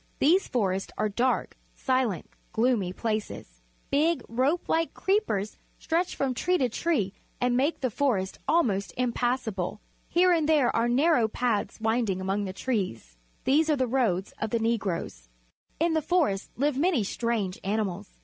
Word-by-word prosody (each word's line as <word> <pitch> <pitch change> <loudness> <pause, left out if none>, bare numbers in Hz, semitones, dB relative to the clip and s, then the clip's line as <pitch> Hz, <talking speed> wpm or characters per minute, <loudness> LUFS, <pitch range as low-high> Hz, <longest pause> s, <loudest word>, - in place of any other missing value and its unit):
These 355 +7 +3
forests 195 -5 -1
are 215 - +1
dark, 245 +5 0 0.2
silent, 255 -8 0 0.3
gloomy 220 -6 +1
places. 210 - -4 0.3
Big, 305 0 +2
rope 265 +9 0
like 330 0 0
creepers 380 - 0 0.2
stretch 340 +2 -1
from 270 -2 0
tree 360 +8 +1
to 255 -5 +1
tree 225 - 0 0.3
and 245 0 +1
make 280 +6 +1
the 255 -3 0
forest 210 -7 0
almost 215 - +1
impassable. 240 -5 -1 0.3
Here 360 +1 +4
and 320 -3 +2
there 295 -6 +3
are 230 +1 +2
narrow 255 -2 +3
paths 225 -1 -1
winding 220 -3 0
among 195 +2 -1
the 190 - -4
trees. 185 - -3 0.3
These 305 +4 +3
are 305 - +4
the 260 -2 +1
roads 225 -7 0
of 220 - -1
the 235 - +1
Negroes. 200 - -2 0.5
In 330 +1 +2
the 315 - +2
forests 305 - +1
live 280 +1 +1
many 320 - +2
strange 210 -3 -2
animals. 200 -1 -2
240 Hz, 150 wpm, -27 LUFS, 200-290 Hz, 0.5 s, Here